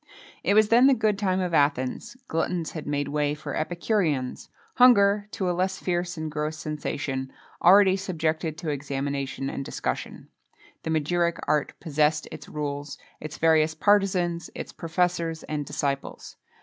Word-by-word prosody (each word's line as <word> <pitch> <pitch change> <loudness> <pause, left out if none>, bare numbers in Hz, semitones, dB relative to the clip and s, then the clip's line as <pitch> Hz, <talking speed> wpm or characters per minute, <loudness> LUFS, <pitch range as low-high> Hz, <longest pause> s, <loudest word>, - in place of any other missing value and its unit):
It 200 - +2
was 215 0 +5
then 240 +3 +6
the 275 - +5
good 215 -3 +1
time 190 -2 +1
of 180 -2 -2
Athens: 145 - 0
gluttons 165 0 -1
had 155 -3 -7
made 145 -1 -1
way 150 0 0
for 150 - -6
epicureans; 160 - -1 0.3
hunger, 205 -4 +6
to 195 -3 -3
a 180 - +1
less 185 +1 -1
fierce 175 -1 -2
and 155 -1 -4
gross 150 +1 -3
sensation, 140 -3 -4 0.3
already 190 +1 +7
subjected 160 -4 -2
to 160 -1 -3
examination 140 -1 -3
and 140 - -4
discussion. - - -4 0.5
The - - -5
magiric 170 +2 +1
art 150 -1 0
possessed 150 -1 +1
its - - -9
rules, 145 -1 -4 0.2
its 155 -1 -7
various 160 -1 +3
partisans, 180 -2 +2
its - - -7
professors, 170 -1 -1
and 150 -2 -4
disciples. 140 -1 -3
160 Hz, 150 wpm, -26 LUFS, 150-185 Hz, 0.5 s, already